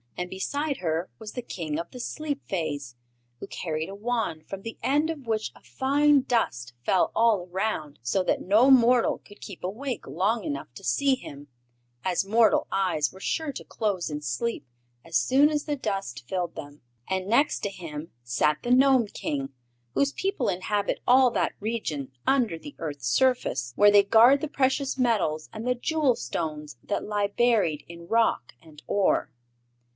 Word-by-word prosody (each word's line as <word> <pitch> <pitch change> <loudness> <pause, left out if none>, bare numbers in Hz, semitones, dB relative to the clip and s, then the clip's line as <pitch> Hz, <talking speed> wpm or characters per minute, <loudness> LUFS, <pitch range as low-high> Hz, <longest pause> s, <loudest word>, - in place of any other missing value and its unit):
And 180 0 -3
beside 285 +9 -2
her 165 0 -2
was 220 -2 -8
the 250 - -4
King 160 -8 -4
of 170 - -5
the 250 - -9
Sleep 290 +2 -4
Fays, 145 -8 -3 0.4
who - - -6
carried 160 0 -4
a 195 - -7
wand 210 -8 -2
from 195 -1 -6
the 225 +2 -7
end 295 +4 +2
of 290 -5 -8
which 220 -1 -1
a - - -17
fine 285 +1 +3
dust 120 - -1
fell 180 +7 +2
all 220 -6 +3
around, 185 -7 -2
so 185 +11 +1
that - - 0
no 215 +8 +4
mortal 245 -2 +5
could 205 - -17
keep 195 -5 -9
awake 235 +7 -4
long 215 +3 0
enough 140 -6 -4
to - - -11
see 265 - +2
him, 145 - -11 0.6
as 185 +1 0
mortal 220 +1 +3
eyes 175 -6 +1
were 190 - -14
sure 310 +9 -2
to - - -7
close 200 -6 -2
in 150 0 -4
sleep 145 - -2 0.4
as - - 0
soon 265 - +4
as 300 -1 -1
the 295 - -1
dust 195 - -4
filled 175 +2 -2
them. 145 +1 -9 0.3
And 190 0 -1
next 275 +8 +3
to 200 - -1
him 165 -5 -8
sat 140 +5 +1
the 245 - -2
Gnome 260 -2 +5
King, 140 -8 -4 0.4
whose 280 0 +1
people 380 -10 -1
inhabit 200 +3 -1
all 255 +1 +6
that - - 0
region 180 - -3 0.2
under 245 -10 +2
the 290 - -10
earth's 145 -6 -5
surface, 130 - +1
where 205 +5 +6
they 205 -1 +7
guard 235 +7 +6
the 310 - -2
precious 270 -1 0
metals 190 -11 +1
and 220 +1 -6
the 250 - +2
jewel 290 0 +1
stones 150 - -4
that 205 - -2
lie 205 -1 0
buried 205 -8 +1
in 170 0 -11
rock 225 - +1
and 155 -2 -16
ore. 200 -2 +1
205 Hz, 175 wpm, -26 LUFS, 160-250 Hz, 0.6 s, they